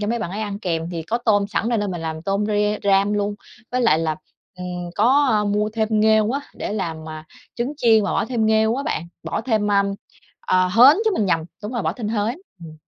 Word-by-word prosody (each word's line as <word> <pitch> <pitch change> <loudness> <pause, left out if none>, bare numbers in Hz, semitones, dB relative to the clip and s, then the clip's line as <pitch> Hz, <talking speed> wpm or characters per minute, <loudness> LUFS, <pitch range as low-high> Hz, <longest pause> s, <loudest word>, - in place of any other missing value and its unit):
cho 205 - -2
mấy 235 +2 -1
bạn 215 -6 -4
ấy 205 +3 -4
ăn 205 -2 -4
kèm, 170 -4 -3
thì 170 -2 -4
có 220 +9 -2
tôm 210 -4 +2
sẵn 220 - -1
nên 205 -5 0
mình 175 - -5
làm 160 -1 -5
tôm 200 +3 -1
re 210 0 0
ram 200 +1 +3
luôn. 205 0 -1 0.4
Với 255 - +1
lại 230 -10 +4
là, 160 -1 -1 0.4
ừm, 180 -1 -5
có 245 -1 +3
mua 210 +1 +1
thêm 220 -1 0
nghêu 220 0 +4
á, 275 +3 -1
để - - -4
làm, 165 -6 -4
à, 155 0 -8 0.3
trứng 245 +4 -2
chiên 225 -6 +4
và - - -1
bỏ - - +1
thêm 225 -2 0
nghêu 220 +1 +3
á 275 - -2
bạn, 170 - -3
bỏ - - -3
thêm, 220 -3 0
ơm, 200 0 +2 0.5
ờ, 185 0 +3
hến 245 +10 +7
chứ, 440 - +3
mình 210 - 0
nhầm. 165 -3 +2 0.2
Đúng 210 - -5
rồi, 240 - -2
bỏ - - 0
thêm 225 -5 -5
hến. 220 +5 -1 0.3
Ừm. 155 -1 -11
210 Hz, 235 wpm, -21 LUFS, 185-225 Hz, 0.5 s, hến